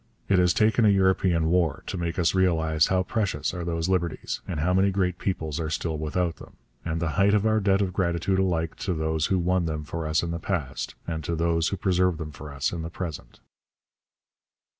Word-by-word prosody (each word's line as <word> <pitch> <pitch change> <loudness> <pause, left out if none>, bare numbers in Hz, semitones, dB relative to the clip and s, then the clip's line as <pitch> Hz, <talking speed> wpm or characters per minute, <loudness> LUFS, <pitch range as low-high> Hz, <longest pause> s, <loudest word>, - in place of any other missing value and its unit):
It 95 -2 +4
has 90 -1 +4
taken 110 +3 +3
a 105 - +6
European 95 -4 +2
war 85 -5 +1
to - - -4
make 85 -1 -3
us 85 -3 +2
realize 80 -4 +2
how 95 -1 +2
precious 105 +1 -1
are 90 -1 -4
those 85 0 -2
liberties, 85 -3 -1
how 85 +1 0
many 95 +2 +4
great 90 -2 0
peoples 80 -5 -2
are 80 -1 -2
still 80 0 -2
without 80 +3 -1
them, - - -13 0.3
and 80 -1 -2
the 85 -1 -1
height 100 +1 +5
of 105 0 +1
our 110 0 +3
debt 100 -1 +2
of 90 -2 -3
gratitude 90 +1 0
alike 85 -4 0
to 95 -3 -2
those 80 0 0
who 95 - +1
won 90 0 +1
them 75 -1 -3
for 80 +1 -4
us 80 +1 +1
in 85 - -2
the 85 - -3
past, 80 -7 -3
and 80 -1 -4
to 85 - -1
those 85 0 +1
who 100 - -2
preserve 90 -1 +1
them 80 -1 -6
for 75 0 -9
us 70 0 -1
in 85 - -4
the 80 - -5
present. 85 -3 -7
85 Hz, 215 wpm, -26 LUFS, 80-95 Hz, 0.3 s, a